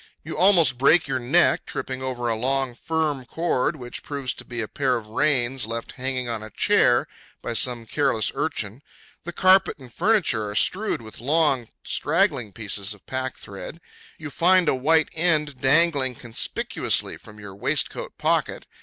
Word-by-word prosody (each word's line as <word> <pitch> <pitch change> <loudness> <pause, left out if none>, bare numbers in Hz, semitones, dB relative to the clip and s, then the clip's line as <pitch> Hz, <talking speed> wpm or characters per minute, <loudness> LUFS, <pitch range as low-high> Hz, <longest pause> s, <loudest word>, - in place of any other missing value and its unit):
You - - -7
almost 170 -10 +4
break 155 +5 +4
your 130 -1 -1
neck 120 0 +2
tripping 130 0 -5
over 125 -2 -3
a 115 - +1
long, 130 +2 0
firm 150 0 -2
cord, 160 +2 -1
which 120 -4 -8
proves 140 -3 -4
to - - -7
be 120 -1 -7
a 110 - -2
pair 130 0 0
of 110 -2 -9
reins 130 -1 0
left 115 0 -5
hanging 130 -1 -3
on 115 -2 -4
a 110 - -9
chair - - +3 0.4
by - - -3
some 120 0 +1
careless 135 -2 0
urchin. 125 -6 -3 0.4
The 175 - -4
carpet 185 +2 +4
and 130 -5 -14
furniture 180 - +1
are 105 - -7
strewed 190 - +1
with 110 0 -11
long, 140 -3 +2 0.2
straggling 150 - +1
pieces 100 0 -4
of 100 - -24
packthread. 130 0 -6 0.4
You 150 -2 -8
find 180 +3 +4
a - - +4
white 155 +5 +2
end 150 -5 0
dangling 140 -2 +3
conspicuously 115 0 -1
from 105 -1 -15
your 105 -2 -10
waistcoat 100 - -2
pocket. - - -1
130 Hz, 165 wpm, -23 LUFS, 115-155 Hz, 0.4 s, almost